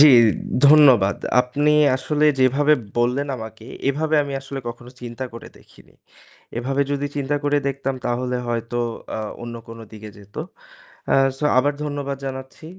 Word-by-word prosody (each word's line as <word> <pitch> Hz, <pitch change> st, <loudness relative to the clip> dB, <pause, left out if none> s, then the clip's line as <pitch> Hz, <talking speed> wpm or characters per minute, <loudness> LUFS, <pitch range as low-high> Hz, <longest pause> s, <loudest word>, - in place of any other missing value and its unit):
জি, 150 Hz, -, +10 dB, 0.6 s
ধন্যবাদ। 130 Hz, -10 st, +6 dB, 0.2 s
আপনি 145 Hz, +4 st, +1 dB, 0.2 s
আসলে 150 Hz, +3 st, 0 dB, 0.2 s
যেভাবে 140 Hz, +4 st, +4 dB, 0.3 s
বললেন 125 Hz, +4 st, +1 dB
আমাকে 110 Hz, -1 st, -9 dB, 0.2 s
এভাবে 155 Hz, +3 st, 0 dB
আমি 140 Hz, -1 st, -5 dB
আসলে 135 Hz, 0 st, -7 dB
কখনো 120 Hz, +1 st, -9 dB
চিন্তা 120 Hz, +1 st, -6 dB
করে 115 Hz, -, -9 dB
দেখিনি। -, -, -21 dB, 0.7 s
এভাবে 135 Hz, +3 st, -1 dB
যদি 145 Hz, 0 st, -1 dB
চিন্তা 145 Hz, 0 st, -1 dB
করে 145 Hz, 0 st, +2 dB
দেখতাম 135 Hz, -1 st, -2 dB
তাহলে 125 Hz, +1 st, -1 dB
হয়তো 120 Hz, 0 st, -2 dB, 0.4 s
আ -, -, -3 dB, 0.2 s
অন্য 120 Hz, 0 st, -6 dB
কোনো 115 Hz, 0 st, -10 dB
দিকে 110 Hz, -1 st, -10 dB
যেত। 100 Hz, 0 st, -17 dB, 0.8 s
আ -, -, +6 dB, 0.2 s
সো 150 Hz, -, -2 dB
আবার 145 Hz, +3 st, +3 dB
ধন্যবাদ 145 Hz, -2 st, -3 dB
জানাচ্ছি। 130 Hz, +3 st, -7 dB
130 Hz, 145 wpm, -22 LUFS, 120-145 Hz, 0.8 s, জি